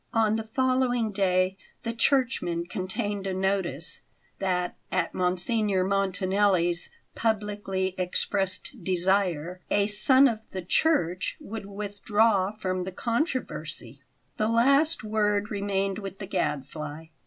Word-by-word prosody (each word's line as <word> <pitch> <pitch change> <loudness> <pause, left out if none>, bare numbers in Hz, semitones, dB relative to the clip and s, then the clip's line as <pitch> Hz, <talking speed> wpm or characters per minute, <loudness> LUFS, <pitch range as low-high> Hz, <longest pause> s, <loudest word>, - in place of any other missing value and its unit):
On 220 -1 +3
the 220 0 -4
following 255 -3 +2
day 190 -1 +2 0.3
the 230 -1 -2
Churchman 230 -10 +1
contained 200 +2 -3
a 190 - -1
notice 185 -5 -1 0.4
that, 180 -2 0 0.2
at 180 -2 0
Monsignor 185 +2 +1
Montanelli's 190 -2 +1 0.2
publicly 205 -4 -1
expressed 190 +4 -2
desire, 180 -2 +1
"A 200 0 +3
Son 260 +6 +5
of 220 -3 -3
the 185 -1 -5
Church" 180 - +1
would 215 -1 -7
withdraw 205 0 +1
from 185 -4 -2
the 190 - -5
controversy. 185 - -3 0.4
The 215 - +1
last 275 +7 +3
word 210 -1 +1
remained 195 -1 -1
with 195 -2 -6
the 195 - -6
Gadfly. 150 0 -3
195 Hz, 115 wpm, -27 LUFS, 185-220 Hz, 0.4 s, Son